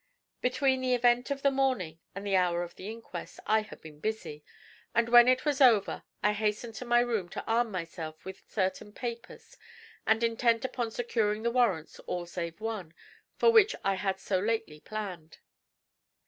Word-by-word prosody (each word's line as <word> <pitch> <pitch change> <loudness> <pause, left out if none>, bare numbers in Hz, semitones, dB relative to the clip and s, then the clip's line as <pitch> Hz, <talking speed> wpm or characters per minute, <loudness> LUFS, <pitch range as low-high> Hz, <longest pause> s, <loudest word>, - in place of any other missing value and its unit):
Between 260 +1 +2
the 255 -1 +2
event 245 +1 +3
of 280 -1 -3
the 280 - +4
morning 255 - 0 0.2
and 200 +1 -6
the 200 -1 +1
hour 175 -2 +2
of 175 - -8
the 195 - -8
inquest 220 -6 -8
I 220 +1 +3
had 215 - -12
been 155 -2 -12
busy, 180 -7 -4 0.5
and 235 0 +3
when 240 0 +8
it 255 +2 +3
was 290 -2 +1
over 230 -6 +5 0.2
I 210 +1 +4
hastened 215 +2 -2
to 250 - -6
my 240 0 +4
room 225 -7 -1
to - - -6
arm 230 +1 +2
myself 165 -4 -6
with 190 0 -8
certain 195 +1 -2
papers 240 - -7 0.5
and 220 +1 +3
intent 230 +1 +2
upon 245 -3 -2
securing 220 -2 -1
the 235 - +1
warrants, 220 -11 +1
all 175 -1 -3
save 170 0 -5
one, 215 -7 -5 0.4
for 465 - +5
which 440 -2 +5
I 195 - +2
had 195 0 -2
so 190 -1 0
lately 215 -7 -2
planned. 185 -5 -7
220 Hz, 175 wpm, -30 LUFS, 185-240 Hz, 0.5 s, when